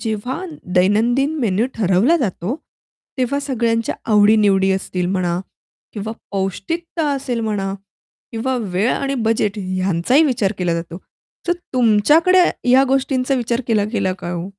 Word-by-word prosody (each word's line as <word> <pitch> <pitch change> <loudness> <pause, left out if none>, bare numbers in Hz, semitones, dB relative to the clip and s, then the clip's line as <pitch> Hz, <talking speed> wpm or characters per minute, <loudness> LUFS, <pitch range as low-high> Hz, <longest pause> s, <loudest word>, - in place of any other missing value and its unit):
जेव्हा 230 - -3 0.3
दैनंदिन 240 +10 +2
मेनू 220 +1 +1
ठरवला 215 - +3
जातो, 215 - -2 0.6
तेव्हा 260 +3 0
सगळ्यांच्या 235 -4 -1 0.2
आवडी-निवडी 205 -2 +4
असतील 185 -1 -2
म्हणा 180 -2 -1 0.5
किंवा 220 +1 -5 0.2
पौष्टिकता 300 - -3
असेल 260 -4 -2
म्हणा 205 -3 -2 0.6
किंवा 255 +3 -1 0.2
वेळ 200 +7 +1
आणि 275 0 -2
बजेट 210 -2 0
ह्यांचाही 185 - +1
विचार 225 -8 +1
केला 175 -2 0
जातो. 170 +1 -5 0.5
तर - - +4 0.2
तुमच्याकडे 295 - +4 0.3
या 260 +1 +6
गोष्टींचा 270 0 +1
विचार 240 0 -1
केला 215 -3 +2
गेला 195 -4 0
का 175 +1 -3
ओ? 170 0 -4
220 Hz, 130 wpm, -19 LUFS, 190-260 Hz, 0.6 s, या